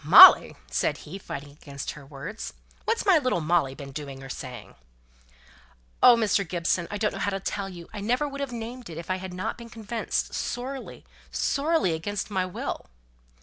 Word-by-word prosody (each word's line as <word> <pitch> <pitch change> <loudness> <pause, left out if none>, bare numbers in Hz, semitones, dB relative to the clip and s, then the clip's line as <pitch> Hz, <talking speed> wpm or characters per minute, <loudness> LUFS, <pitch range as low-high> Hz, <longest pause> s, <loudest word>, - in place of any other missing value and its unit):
"Molly!" - - +10
said 60 +1 0
he, 185 +6 -7
fighting 145 -6 -7
against 140 -1 -7
her 150 - -11
words. 150 +10 -7 0.3
"What's 460 0 0
my 375 -5 +6
little 255 -10 +1
Molly 155 -4 +1
been 140 -1 -8
doing 135 -1 -7
or 135 - -9
saying?" 125 -4 -7 1.3
"Oh! 245 - +9
Mr. 215 -3 +2
Gibson, 175 0 0
I 205 - -3
don't 210 0 0
know - - -5
how - - +1
to 195 -1 -2
tell 195 0 -3
you. 175 -2 -10
I 210 - -5
never 250 +8 +1
would 280 0 -6
have 275 -2 -3
named 240 0 -6
it, 160 - -7
if 170 +2 -5
I 185 - +1
had 190 0 -6
not 185 +6 -4
been 235 0 -9
convinced, 225 0 -3
sorely, 260 +3 -4 0.2
sorely 290 - +1
against 205 +6 -3
my 185 -2 0
will." 180 - -5
190 Hz, 190 wpm, -27 LUFS, 155-235 Hz, 1.3 s, Molly